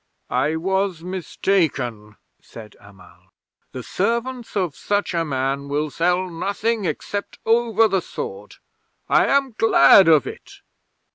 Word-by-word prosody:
'"I 135 +5 +1
was 190 0 -1
mistaken," 155 - -2 0.2
said 110 -2 -13
Amal. 100 -1 -19 0.4
"The 125 - -7
servants 235 - -2
of 180 -7 -1
such 205 -2 -2
a 170 -1 0
man 135 -1 -2
will 150 +1 -2
sell 180 +4 0
nothing 200 +5 -2
except 200 +5 -4
over 225 -1 +3
the 195 -3 0
sword. 470 - -8 0.5
I - - +3
am 275 -2 +1
glad 190 -4 +6
of 155 -4 +5
it." - - -10
180 Hz, 125 wpm, -21 LUFS, 140-210 Hz, 0.5 s, glad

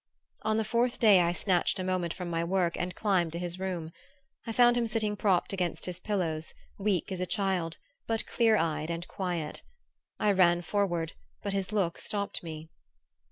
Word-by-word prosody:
On 215 0 +1
the 220 - +2
fourth 240 +2 +1
day 210 -5 +7
I 170 0 +2
snatched 180 +1 +1
a 185 - -2
moment 185 -2 0
from 180 0 -5
my 165 -1 -1
work 175 -1 +1
and 180 0 -3
climbed 185 -6 +1
to - - -3
his 175 +1 -3
room. 180 -4 -3 0.6
I - - -1
found 240 +1 +5
him 240 -1 +1
sitting 215 -1 0
propped 195 -2 +1
against 180 -3 -1
his 180 -1 -4
pillows, 170 -6 -2 0.2
weak 195 -2 0
as 185 -1 -3
a 185 - -1
child 180 -4 -1 0.3
but 225 -1 0
clear 225 -2 +3
eyed 160 -2 -1
and 170 +1 -3
quiet. 175 -5 -3 0.6
I 210 - +3
ran 175 -2 +4
forward, 175 -4 0 0.3
but 200 -1 -1
his 195 0 -2
look 195 -6 0
stopped 200 -1 -2
me. 160 -2 -7
185 Hz, 185 wpm, -30 LUFS, 170-205 Hz, 0.6 s, day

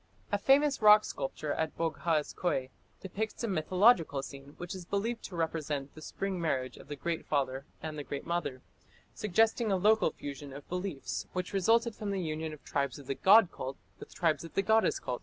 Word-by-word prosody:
A 205 - +1
famous 275 +4 +4
rock 210 0 +8
sculpture 145 +2 -3
at 160 -1 -2
Boghaz 160 -1 0
Köi 130 -7 -1 0.3
depicts 210 +5 -4
a - - 0
mythological 180 - +3
scene 140 +1 -10
which 175 0 -6
is 185 -2 -7
believed 220 +6 -2
to 185 - -7
represent 150 -4 -2
the 155 - -12
Spring 190 +3 -3
marriage 130 -6 -1
of - - -13
the 145 - -5
Great 165 +3 -3
Father 135 -2 -1 0.2
and 155 -1 -4
the - - -4
Great 140 0 -5
Mother, 170 -7 -2 0.5
suggesting 220 +2 +2
a 190 - +3
local 215 +2 +4
fusion 140 -1 -8
of 140 +1 -10
beliefs 145 - -4
which 180 +1 -3
resulted 225 +4 +3
from 210 -1 -5
the 195 -1 -1
union 160 -2 -3
of 150 - -11
tribes 140 -2 -1
of 140 - -11
the 135 - -2
god 195 +6 +6
cult 135 +1 -6 0.2
with - - -11
tribes 165 -3 +1
of 165 - -10
the 195 - +2
goddess 220 +2 +3
cult. 125 - -4
165 Hz, 195 wpm, -31 LUFS, 145-200 Hz, 0.5 s, rock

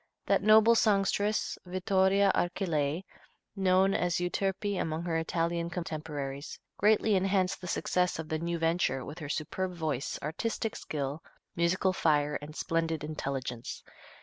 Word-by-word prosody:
That - - +3
noble 220 +2 +7
songstress, 205 -1 +1
Vittoria 190 +1 +2
Archilei, 170 -3 0 0.5
known 190 0 +3
as 175 -1 +1
"Euterpe" 195 +2 -1
among 160 +1 -2
her 170 -2 -1
Italian 170 +1 -1
contemporaries, 150 -5 -5 0.2
greatly 215 0 +3
enhanced 190 -1 +1
the 180 - -6
success 180 +1 0
of 160 -1 -5
the 160 -1 -2
new 170 +1 -2
venture 165 -5 0
with 155 +4 -8
her 150 -3 -6
superb 180 +5 -2
voice, 155 -5 -2
artistic 220 +8 -2
skill, 145 +1 -4 0.3
musical 180 +2 +2
fire 150 -4 +2
and 150 +1 -9
splendid 165 -2 -1
intelligence. 135 -5 -4
170 Hz, 130 wpm, -30 LUFS, 155-190 Hz, 0.5 s, noble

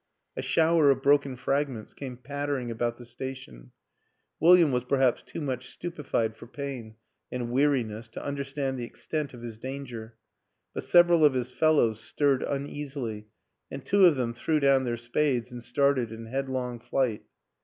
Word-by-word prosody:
A - - -3
shower 160 +3 +4
of 135 -1 +2
broken 140 -2 +3
fragments 135 -3 -2
came 130 -3 -7
pattering 140 -2 -3
about 120 +1 -2
the 120 - -11
station; 120 - -8 0.7
Wil 175 +3 +8
liam 170 -5 +4
was 125 -1 0
perhaps 130 -1 +2
too - - -7
much 130 -3 -3
stupefied 145 -10 -2
by 115 - -12
pain 130 -5 -6 0.4
and 120 -1 -3
weariness 120 -5 +1
to 115 - -8
understand 140 -1 -3
the - - -3
extent 145 +3 -4
of 120 - -11
his 115 -2 -7
danger 125 -4 -7 0.6
but - - -5
several 175 -2 +6
of 145 -3 +5
his 125 0 -2
fellows 135 -9 +3
stirred 140 +2 +1
uneasily 135 -6 -4 0.4
and - - -7
two 200 -1 +5
of 165 - +4
them 120 -3 -1
threw 155 +6 0
down 135 -2 +4
their 120 -1 -1
spades 120 +1 0
and 120 -1 -7
started 130 -2 +1
in 115 0 -8
headlong 130 -1 -3
flight. 120 -2 -1
130 Hz, 165 wpm, -28 LUFS, 120-140 Hz, 0.7 s, Wil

